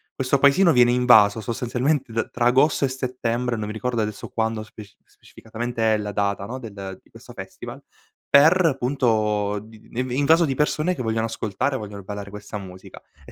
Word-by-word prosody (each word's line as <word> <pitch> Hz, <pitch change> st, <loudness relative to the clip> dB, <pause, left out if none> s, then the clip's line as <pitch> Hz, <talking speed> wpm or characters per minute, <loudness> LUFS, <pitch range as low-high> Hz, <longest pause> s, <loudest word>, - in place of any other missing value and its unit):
questo 135 Hz, +1 st, 0 dB
paesino 145 Hz, +6 st, +5 dB
viene 120 Hz, -4 st, +5 dB
invaso 115 Hz, -4 st, +5 dB
sostanzialmente 125 Hz, +4 st, -1 dB
da 115 Hz, 0 st, 0 dB
tra 120 Hz, -, -2 dB
Agosto 135 Hz, +4 st, +3 dB
e -, -, +1 dB
Settembre, 125 Hz, -2 st, -2 dB
non 105 Hz, -1 st, -4 dB
mi 105 Hz, -, -5 dB
ricordo 120 Hz, +1 st, -2 dB
adesso 105 Hz, -1 st, -5 dB
quando 110 Hz, -1 st, -2 dB
speci 105 Hz, -2 st, -13 dB
specificatamente 115 Hz, 0 st, -4 dB
è -, -, 0 dB
la 105 Hz, -1 st, -4 dB
data 100 Hz, -1 st, -1 dB
no, 120 Hz, +5 st, -6 dB
del 100 Hz, -6 st, -8 dB
di -, -, -27 dB
questo -, -, -14 dB
festival; -, -, -9 dB, 0.5 s
per 160 Hz, +1 st, +5 dB
punto 110 Hz, -5 st, 0 dB
di 110 Hz, 0 st, -17 dB
in 125 Hz, +1 st, -3 dB
invaso 150 Hz, +6 st, +3 dB
di 135 Hz, -, -1 dB
persone 155 Hz, +4 st, 0 dB
che 130 Hz, -, -5 dB
vogliono 110 Hz, -1 st, -1 dB
ascoltare, 115 Hz, +4 st, -2 dB
vogliono 100 Hz, -3 st, -8 dB
ballare 100 Hz, +1 st, -7 dB
questa 105 Hz, +1 st, -8 dB
musica, 95 Hz, -1 st, -12 dB, 0.2 s
e -, -, -13 dB
115 Hz, 180 wpm, -23 LUFS, 105-130 Hz, 0.5 s, paesino